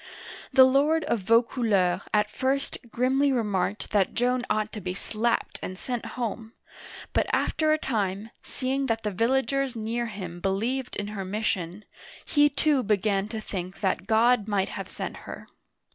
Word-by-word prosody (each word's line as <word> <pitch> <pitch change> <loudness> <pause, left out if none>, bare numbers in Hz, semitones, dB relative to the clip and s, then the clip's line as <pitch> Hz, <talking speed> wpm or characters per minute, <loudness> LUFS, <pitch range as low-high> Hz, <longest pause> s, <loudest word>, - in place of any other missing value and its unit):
The 265 -1 +8
lord 285 +5 +4
of 235 - 0
Vaucouleurs 220 -3 +2
at 210 0 +2
first 270 +4 -1
grimly 265 +4 +2
remarked 205 -5 -1
that 200 -3 +2
Joan 250 +1 +2
ought 215 0 0
to 215 - -5
be 180 0 -4
slapped 230 +4 -1
and 185 - -5
sent 245 +3 -4
home, 225 -1 -4 0.6
but - - +2
after 310 -1 +1
a 310 - +4
time, 210 -5 -2
seeing 270 +1 -2
that 225 -1 -1
the 210 - -1
villagers 265 +5 +1
near 230 +2 -2
him 185 -5 -7
believed 230 +8 -1
in 205 0 -3
her 205 -2 -4
mission, 190 -1 -2 0.4
he 295 0 +4
too 285 0 +2
began 205 -2 +1
to 220 0 -5
think 185 -3 -6
that 190 -2 0
God 225 0 +4
might 200 -2 0
have - - -6
sent - - -5
her. - - -9
225 Hz, 160 wpm, -27 LUFS, 200-255 Hz, 0.6 s, The